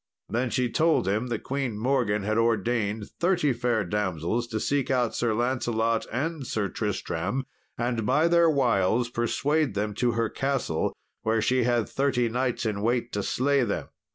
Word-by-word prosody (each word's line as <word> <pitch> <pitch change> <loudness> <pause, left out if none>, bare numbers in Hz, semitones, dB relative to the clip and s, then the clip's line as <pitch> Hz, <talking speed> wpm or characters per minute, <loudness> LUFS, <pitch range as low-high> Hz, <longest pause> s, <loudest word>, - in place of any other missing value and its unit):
Then 120 +2 0
she 125 +1 +1
told 155 - +2
him 105 +5 0
that 120 -3 -3
Queen 135 -5 -2
Morgan 115 -4 +1
had 110 +2 +1
ordained 110 -2 0
thirty 175 -6 +2
fair 120 -2 0
damsels 100 +3 -1
to 110 -2 -3
seek 140 +3 0
out 125 -3 +1
Sir 120 -2 0
Lancelot 115 -2 0
and 145 +2 -2
Sir 105 -3 -1
Tristram, 125 +11 -2 0.3
and 120 -1 -1
by 150 +10 +3
their 170 -1 +5
wiles 120 -4 +2
persuade 140 +2 0
them 105 +1 -1
to 120 +3 +1
her 115 0 +1
castle, 135 - -1 0.3
where 110 0 +1
she 125 +2 +2
had 120 -2 +1
thirty 130 -4 +1
knights 125 +1 -1
in 105 -2 -1
wait 120 +2 0
to 105 - -1
slay 140 +7 +1
them. - - -3
120 Hz, 165 wpm, -26 LUFS, 110-130 Hz, 0.3 s, their